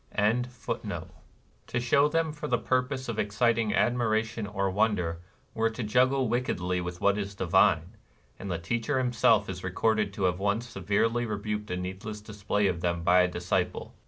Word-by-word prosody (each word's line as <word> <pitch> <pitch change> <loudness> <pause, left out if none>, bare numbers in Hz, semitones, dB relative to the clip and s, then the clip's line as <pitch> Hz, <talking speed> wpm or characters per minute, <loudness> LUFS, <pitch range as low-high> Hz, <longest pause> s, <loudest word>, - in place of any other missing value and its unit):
NIRVANA 115 +4 +2
255 125 - -5 0.6
To 120 - -1
show 140 +4 +3
them 160 0 0
for 150 0 -6
the - - +2
purpose 130 +1 -1
of 115 -2 -3
exciting 110 +1 +1
admiration 115 -2 +1
or 100 -1 -1
wonder 95 -5 0 0.3
were 115 0 +1
to 115 +2 -5
juggle 130 +4 +2
wick 120 +3 0
edly 90 -3 -1
with 85 0 -6
what 100 +1 +3
is 100 0 -4
divine; 95 0 +2 0.4
and 100 - -6
the 85 - -1
Teacher 115 - -1
himself 115 -4 +3
is 95 -1 -6
recorded 105 +3 +1
to 100 - -4
have 90 0 +1
once 100 +4 0
severely 115 +3 0
rebuked 105 0 -3
a 90 - -2
needless 95 +4 -5
display 105 -1 -2
of 85 -4 0
them 85 -1 -1
by 90 +1 +5
a 90 - +3
dis 90 0 -7
ciple. 90 -1 0
105 Hz, 180 wpm, -28 LUFS, 95-120 Hz, 0.6 s, by